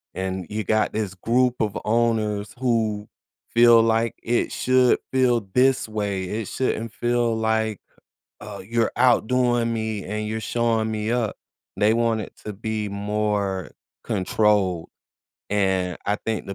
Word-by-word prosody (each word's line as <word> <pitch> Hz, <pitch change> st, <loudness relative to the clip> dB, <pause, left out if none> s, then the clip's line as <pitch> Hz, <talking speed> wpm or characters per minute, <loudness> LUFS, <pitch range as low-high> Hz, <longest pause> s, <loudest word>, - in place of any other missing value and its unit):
and 95 Hz, -1 st, -3 dB
you 110 Hz, +1 st, -3 dB
got 110 Hz, +2 st, +1 dB
this 105 Hz, -3 st, -2 dB
group 125 Hz, +5 st, +1 dB
of 105 Hz, -2 st, -1 dB
owners 110 Hz, -2 st, 0 dB
who 110 Hz, -4 st, 0 dB, 0.5 s
feel 115 Hz, -1 st, +7 dB
like, 115 Hz, 0 st, +1 dB
"It 120 Hz, +1 st, 0 dB
should 130 Hz, -1 st, +3 dB, 0.2 s
feel 125 Hz, -3 st, +3 dB
this 130 Hz, -1 st, +3 dB
way. 100 Hz, -3 st, -2 dB
It 105 Hz, +2 st, -4 dB
shouldn't 115 Hz, -3 st, -2 dB
feel 120 Hz, -1 st, 0 dB
like, 110 Hz, -2 st, 0 dB, 0.6 s
uh, 105 Hz, -2 st, -8 dB
you're 115 Hz, -1 st, +1 dB
outdoing 120 Hz, -1 st, +3 dB
me 110 Hz, -2 st, -3 dB
and 105 Hz, +1 st, -3 dB
you're 110 Hz, +1 st, -3 dB
showing 115 Hz, 0 st, 0 dB
me 110 Hz, 0 st, -2 dB
up." 120 Hz, -4 st, -1 dB, 0.4 s
They 105 Hz, +2 st, +4 dB
want 115 Hz, -1 st, +1 dB
it 100 Hz, -, -9 dB
to 105 Hz, -, -3 dB
be 110 Hz, +1 st, -3 dB
more 100 Hz, -2 st, -2 dB, 0.3 s
controlled. 95 Hz, -3 st, +1 dB, 0.6 s
And, 95 Hz, -3 st, 0 dB
I 105 Hz, -, +1 dB
think 110 Hz, -1 st, -2 dB
the 95 Hz, -, -5 dB
110 Hz, 140 wpm, -23 LUFS, 105-115 Hz, 0.6 s, feel